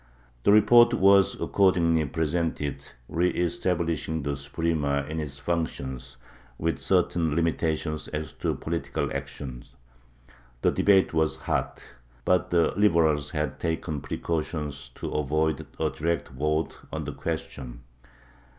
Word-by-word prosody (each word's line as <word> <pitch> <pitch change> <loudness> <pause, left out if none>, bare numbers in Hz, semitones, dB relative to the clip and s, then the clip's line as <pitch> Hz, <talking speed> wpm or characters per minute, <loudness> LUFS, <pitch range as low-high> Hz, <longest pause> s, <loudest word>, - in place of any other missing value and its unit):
The - - +6
report 120 +3 +7
was 100 -2 +5
accordingly 85 -5 +3
presented, 75 -2 -2 0.2
re 90 +2 +1
establishing 85 -3 -1
the 70 0 -1
Suprema 70 0 -1
in 80 +1 -3
its 70 -3 -5
functions, 65 -6 -3 0.4
with 80 +1 -1
certain 85 -4 +1
limitations 80 -2 -1
as 75 0 -5
to - - -2
political 85 +1 -3
action; 65 -4 -6 1.0
the - - +4
debate 95 -3 +4
was 80 -1 +1
hot, - - -2 0.4
but 90 -1 +2
the 85 -2 +3
Liberals 80 -7 +3
had 75 -3 -3
taken 80 -3 -2
precautions 75 -3 -3
to - - -5
avoid 80 +1 0
a - - +1
direct 85 +2 -2
vote 75 +4 -1
on - - -4
the - - -4
question. 60 -2 -5
80 Hz, 120 wpm, -27 LUFS, 75-85 Hz, 1.0 s, report